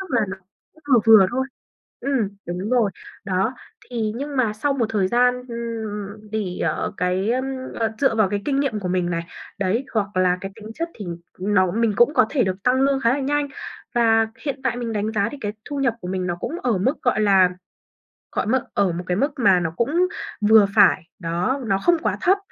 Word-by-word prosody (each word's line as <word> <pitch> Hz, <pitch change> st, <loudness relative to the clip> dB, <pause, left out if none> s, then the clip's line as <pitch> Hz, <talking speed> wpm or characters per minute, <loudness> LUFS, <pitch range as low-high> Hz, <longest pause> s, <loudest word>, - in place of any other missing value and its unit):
tức 385 Hz, -, -6 dB
là 225 Hz, -4 st, +2 dB
nó 195 Hz, -, -5 dB, 0.5 s
vừa 255 Hz, -5 st, +5 dB
vừa 215 Hz, -4 st, +8 dB
thôi. 260 Hz, +2 st, -1 dB, 0.5 s
Ừm, 265 Hz, -8 st, 0 dB, 0.2 s
đúng 180 Hz, +6 st, -4 dB
rồi. 235 Hz, -5 st, +3 dB, 0.3 s
Đó, 195 Hz, +5 st, 0 dB, 0.4 s
thì 225 Hz, -3 st, -1 dB
nhưng 285 Hz, +1 st, -5 dB
mà 230 Hz, -5 st, +2 dB
sau 275 Hz, +7 st, 0 dB
một 245 Hz, -5 st, 0 dB
thời 200 Hz, -4 st, +1 dB
gian, 245 Hz, +2 st, +3 dB
ừm, 215 Hz, -3 st, -5 dB
thì, 205 Hz, -5 st, -3 dB
ờ, 155 Hz, -2 st, -1 dB
cái, 185 Hz, +4 st, 0 dB
ờm, 255 Hz, +2 st, 0 dB, 0.3 s
ờ, 225 Hz, -1 st, -1 dB
dựa 270 Hz, -5 st, +2 dB
vào 215 Hz, -3 st, +3 dB
cái 205 Hz, -1 st, -2 dB
kinh 275 Hz, -1 st, +1 dB
nghiệm 225 Hz, -7 st, -1 dB
của 180 Hz, -, -3 dB
mình 180 Hz, -1 st, 0 dB
này, 170 Hz, 0 st, -2 dB, 0.3 s
đấy, 200 Hz, +7 st, 0 dB
hoặc 205 Hz, -3 st, -1 dB
là 180 Hz, -1 st, +3 dB
cái 195 Hz, +1 st, -6 dB
tính 215 Hz, 0 st, -11 dB
chất 335 Hz, +1 st, -3 dB
thì 205 Hz, -, -8 dB, 0.3 s
nó 185 Hz, -1 st, +2 dB
mình 230 Hz, 0 st, +1 dB
cũng 240 Hz, +7 st, +4 dB
có -, -, +5 dB
thể 255 Hz, -7 st, +2 dB
được 190 Hz, +1 st, -3 dB
tăng 255 Hz, +3 st, +2 dB
lương 275 Hz, 0 st, +2 dB
khá 230 Hz, -, +3 dB
là 285 Hz, -, -2 dB
nhanh 290 Hz, +1 st, 0 dB, 0.5 s
và 225 Hz, -1 st, +4 dB
hiện 280 Hz, -3 st, -3 dB
tại 245 Hz, -3 st, 0 dB
mình 235 Hz, -2 st, -3 dB
đánh 215 Hz, +1 st, -1 dB
giá 200 Hz, -2 st, +1 dB
thì 290 Hz, -, -7 dB
cái 205 Hz, -1 st, -2 dB
thu 290 Hz, -1 st, -5 dB
nhập 240 Hz, -4 st, +2 dB
của 180 Hz, -, -6 dB
mình 185 Hz, -1 st, -2 dB
nó 175 Hz, -1 st, -2 dB
cũng 340 Hz, +3 st, -4 dB
ở 230 Hz, -6 st, +1 dB
mức, 260 Hz, +11 st, 0 dB
gọi 245 Hz, -3 st, +2 dB
là, 195 Hz, -3 st, +5 dB, 0.8 s
gọi -, -, -1 dB
mức 255 Hz, +2 st, +2 dB
ở 200 Hz, -3 st, +2 dB
một 175 Hz, +2 st, -4 dB
cái 180 Hz, -, 0 dB
mức 280 Hz, +7 st, +1 dB
mà 200 Hz, -7 st, +4 dB
nó 165 Hz, -2 st, -2 dB
cũng 325 Hz, +10 st, +2 dB, 0.4 s
vừa 220 Hz, -2 st, +8 dB
phải, 190 Hz, -3 st, +5 dB, 0.2 s
đó, 180 Hz, +11 st, -1 dB
nó 195 Hz, -3 st, +1 dB
không 345 Hz, -, +3 dB
quá -, -, 0 dB
thấp 380 Hz, +2 st, +4 dB
220 Hz, 220 wpm, -22 LUFS, 195-255 Hz, 0.8 s, vừa